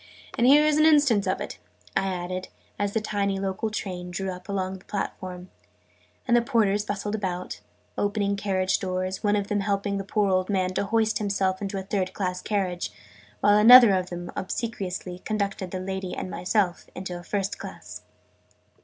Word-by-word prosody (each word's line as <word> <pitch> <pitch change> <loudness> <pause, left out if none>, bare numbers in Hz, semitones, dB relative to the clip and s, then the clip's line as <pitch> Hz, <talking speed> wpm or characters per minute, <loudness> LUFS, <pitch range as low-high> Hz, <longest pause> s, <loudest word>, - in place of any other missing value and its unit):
And 240 - +3
here 295 +3 +7
is 305 -1 +3
an 310 - +6
instance 285 -10 +4
of - - 0
it," - - -6 0.4
I 195 - +1
added, 185 0 -3 0.3
as 205 0 -1
the 220 - +1
tiny 200 -2 -1
local 195 +3 -2
train 180 -4 -5
drew 190 +2 -3
up 180 +2 -10
alongside 190 -1 -2
the - - -23
platform, 185 -2 -5 0.8
and 240 - +4
the 240 - +5
porters 215 -5 +2
bustled 205 0 -3
about, 185 -4 -3 0.4
opening 205 0 0
carriage 190 -2 0
doors 185 -1 -3
one 205 0 +3
of 205 -1 0
them 205 0 0
helping 200 0 -1
the - - -3
poor 200 0 +1
old 185 +1 +1
man 185 -2 0
to 200 - -1
hoist 220 +1 +1
himself 195 -2 0
into 195 0 -3
a 190 - -3
third 190 -1 -2
class 185 -2 -2
carriage, 185 -4 -2 0.5
while 205 0 +5
another 235 -1 +10
of 185 -1 0
them 175 0 -6
obsequiously 185 -4 -4
conducted 200 -2 -2
the 185 - -4
lady 190 0 -4
and 185 - -5
myself 180 +1 0
into 185 -1 -5
a - - -10
first 200 +1 -2
class. - - -9
195 Hz, 180 wpm, -26 LUFS, 185-210 Hz, 0.8 s, another